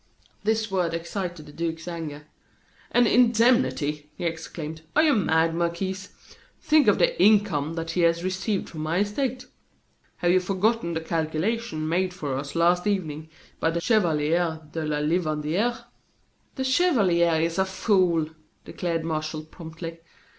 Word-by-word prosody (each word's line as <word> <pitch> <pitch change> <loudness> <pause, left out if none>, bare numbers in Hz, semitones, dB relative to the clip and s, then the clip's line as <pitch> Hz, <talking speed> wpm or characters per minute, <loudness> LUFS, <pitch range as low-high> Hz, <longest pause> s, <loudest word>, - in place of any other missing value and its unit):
This 220 0 0
word 175 -3 0
excited 170 -1 -5
the - - -12
duke's 165 +1 -4
anger. 155 -4 -6 0.6
"An 245 0 +4
indemnity!" 230 - +3
he - - -7
exclaimed. 160 -1 -5
"Are 310 - +5
you 305 -2 +4
mad, 165 -6 +2
Marquis? 185 +3 -2 0.5
Think 310 -1 +3
of - - +5
the - - +2
income 195 -8 +3
that 165 0 -3
he 175 - 0
has 170 0 +2
received 190 +2 -2
from 155 - -7
my 155 +2 -1
estate. 250 +5 -2 0.7
Have 175 - +2
you 185 - +5
forgotten 195 0 0
the 160 - -1
calculation 160 +3 -2
made 180 +2 0
for 145 -6 -3
us 140 +3 -5
last 175 +3 +3
evening 160 -6 -2 0.3
by 165 - +2
the 165 +1 -1
Chevalier 170 -5 +1
de 160 0 -3
la 150 -1 -1
Livandiere?" 160 +8 0 0.7
"The 265 - -2
chevalier 200 - +3
is 165 +3 0
a 190 - +3
fool!" 185 -4 +2 0.4
declared 165 -2 -3
Martial 155 -1 -3
promptly. 165 +1 -9
170 Hz, 145 wpm, -25 LUFS, 160-205 Hz, 0.7 s, Are